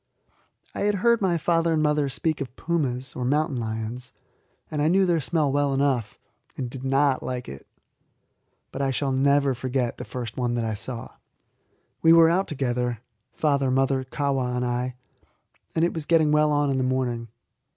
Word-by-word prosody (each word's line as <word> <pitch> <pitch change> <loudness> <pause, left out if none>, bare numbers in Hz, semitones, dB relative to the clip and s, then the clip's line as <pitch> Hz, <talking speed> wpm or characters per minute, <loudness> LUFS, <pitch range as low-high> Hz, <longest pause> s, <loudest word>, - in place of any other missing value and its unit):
I - - -6
had 205 0 +1
heard 235 +3 +3
my 180 -3 +2
father 165 0 +1
and 155 -1 +1
mother 150 -2 +2
speak 155 +3 -2
of 130 -2 -6
pumas, 135 -6 -2
or 125 - -3
mountain 145 +2 +1
lions, 115 +3 -5 0.6
and 150 - -1
I 150 - +3
knew 190 +3 +4
their 175 -2 +2
smell 155 -1 +1
well 140 0 +1
enough 135 -6 0 0.4
and 125 -3 -4
did 130 0 -8
not 135 0 +2
like 125 -1 -4
it. 70 0 -10 1.0
But 135 - -4
I 135 - +1
shall 135 +1 -1
never 140 +1 +3
forget 125 0 -2
the - - -4
first 120 -4 -6
one 120 -1 0
that 120 -1 -1
I 110 - -1
saw. 115 +2 -6 0.9
We 165 0 +6
were 165 -1 +7
out 190 +3 +1
together 125 -4 -2 0.3
father, 140 -3 +1
mother, 135 0 +1
Kahwa, 130 -2 -1
and 125 0 -1
I 125 +1 -2 0.8
and 165 +1 +3
it 175 - -1
was 160 -3 -4
getting 160 -3 +4
well 150 0 +3
on 145 -1 +2
in 135 - 0
the - - +1
morning. 125 -2 -1
135 Hz, 180 wpm, -25 LUFS, 125-150 Hz, 1.0 s, were